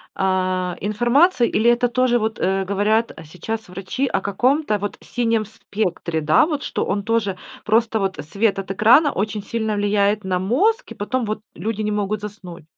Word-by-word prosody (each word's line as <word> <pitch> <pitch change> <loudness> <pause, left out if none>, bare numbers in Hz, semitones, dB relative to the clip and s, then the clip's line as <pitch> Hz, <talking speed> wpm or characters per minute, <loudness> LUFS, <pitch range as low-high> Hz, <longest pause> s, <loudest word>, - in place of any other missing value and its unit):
а, 185 -1 0
информации, 240 - +3
или 230 +2 +3
это 240 +1 +3
тоже 245 0 +2
вот, 220 0 -2
э 190 +1 +1
Говорят 210 +4 +1
сейчас 215 +8 -6
врачи 195 +9 -3
о - - -1
каком-то 245 +4 +1
вот 205 0 -4
синем 230 -3 -1
спектре, 180 -6 -3
да, 155 - +4
вот 300 -3 -3
что - - -2
он 200 +1 -1
тоже, 215 -4 0 0.3
просто 225 0 +2
вот 195 -1 -1
свет 200 -1 +1
от 195 0 -5
экрана 245 +10 +5
очень 210 0 -3
сильно 220 -2 -2
влияет 205 0 +1
на 185 -1 -1
мозг, 390 - +1
и - - -7
потом 240 +4 -2
вот 215 0 -3
люди 215 0 -3
не 210 - -1
могут 210 0 -1
заснуть. 195 -6 -9
210 Hz, 175 wpm, -21 LUFS, 195-230 Hz, 0.3 s, экрана